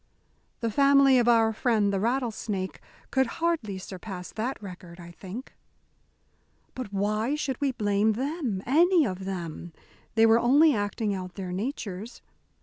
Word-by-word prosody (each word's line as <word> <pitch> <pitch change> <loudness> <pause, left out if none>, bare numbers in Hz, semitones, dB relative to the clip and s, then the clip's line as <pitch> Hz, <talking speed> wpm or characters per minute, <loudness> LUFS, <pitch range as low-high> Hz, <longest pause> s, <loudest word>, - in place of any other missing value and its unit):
The 230 -1 -1
family 275 +1 +5
of 240 - +1
our 225 -2 +4
friend 215 -3 +1
the 195 - 0
rattlesnake 220 -4 -2 0.3
could 265 -1 +2
hardly 325 - -1
surpass 185 -1 -8
that 235 +5 -3
record, 180 -3 -10
I 170 0 -10
think. 195 +9 -9 1.2
"But 255 -6 -6
why 215 +6 0
should 275 -4 -3
we 280 -2 +2
blame 205 -1 +1
them 260 - -3
any 335 +5 +4
of 190 -3 -4
them? 175 -3 -6 0.4
They 225 0 +6
were 225 +1 +5
only 285 +6 +5
acting 205 0 -1
out 185 -2 -6
their 185 -3 -5
natures. 210 0 -5
220 Hz, 145 wpm, -27 LUFS, 195-260 Hz, 1.2 s, They